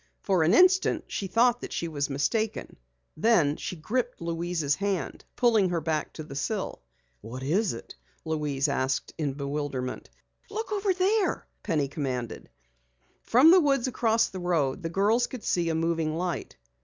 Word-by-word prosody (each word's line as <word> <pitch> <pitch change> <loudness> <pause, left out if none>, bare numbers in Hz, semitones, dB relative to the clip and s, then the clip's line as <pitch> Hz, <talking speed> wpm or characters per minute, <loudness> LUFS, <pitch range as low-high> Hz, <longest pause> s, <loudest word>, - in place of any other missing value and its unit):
For 190 -4 +2
an 165 +7 +4
instant 370 +1 +4
she 195 - -3
thought 240 +5 +3
that - - -7
she 170 - -2
was 145 -3 -2
mistaken. 215 - -1 0.4
Then 160 -6 +3
she 185 - -5
gripped 245 +9 -2
Louise's 170 -3 -1
hand, 195 +2 -2
pulling 225 -6 +3
her 175 -1 0
back 155 -1 -2
to 155 - -7
the 145 - -10
sill. 190 - -3 0.4
"What 125 +5 -7
is 185 +9 +1
it?" - - -9 0.3
Louise 150 -3 -1
asked 135 -1 -1
in 145 -3 -1
bewilderment. 140 -2 -4 0.4
"Look 430 +1 -4
over 405 -1 +1
there!" 380 +3 +1 0.2
Penny 150 -4 0
commanded. 130 -5 -4 0.7
From 265 +8 +6
the 370 0 +7
woods 275 -4 +2
across 230 -2 +2
the 190 - -7
road 170 -4 0
the 165 - -3
girls 210 +7 +2
could 250 -4 -8
see 170 -2 0
a 160 - 0
moving 165 -1 0
light. 175 - -3
170 Hz, 160 wpm, -27 LUFS, 150-230 Hz, 0.7 s, the